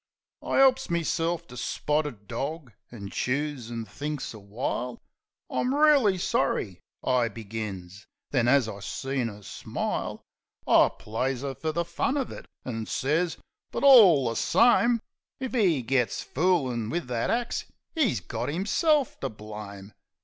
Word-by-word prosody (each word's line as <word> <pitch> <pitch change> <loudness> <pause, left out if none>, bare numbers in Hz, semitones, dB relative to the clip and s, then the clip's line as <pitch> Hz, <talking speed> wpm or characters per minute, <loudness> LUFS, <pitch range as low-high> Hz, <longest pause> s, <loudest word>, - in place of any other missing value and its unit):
I - - 0
'elps 265 0 +4
meself 170 0 0
to 125 - -10
spotted 135 -3 -2
dog, 140 - -4 0.2
an' 100 -4 -8
chews, 135 -2 -2
an' 115 -1 -4
thinks 145 +6 -5
a 110 - -10
while. 120 +4 -3 0.5
"I'm 255 +2 0
reely 285 -10 +5
sorry," 110 - 0 0.2
I 125 -2 +2
begins. 105 -4 -7 0.2
Then, 125 -4 +2
as 130 -2 +4
I 100 -2 -6
seen 130 +4 -2
'er 105 -1 -11
smile, - - -4 0.4
I - - +6
plays 125 +4 -2
'er 140 -1 -3
fer 155 +3 -3
the 170 +2 -1
fun 170 - -1
uv 275 -3 -2
it, - - -9 0.2
an' 115 -3 -4
sez, 160 +5 0 0.3
"But, - - -3
all 200 - +8
the 115 - -2
same, 235 - +4 0.4
If 260 -1 -4
he 180 - +2
gits 125 -3 0
foolin' 130 -9 0
wiv 170 +5 -2
that 120 -2 -1
axe 240 0 -1 0.3
'e's 250 - +1
got 90 - -4
'imself 250 - +1
to 135 - -2
blame." 105 -2 -9
135 Hz, 145 wpm, -27 LUFS, 115-175 Hz, 0.5 s, all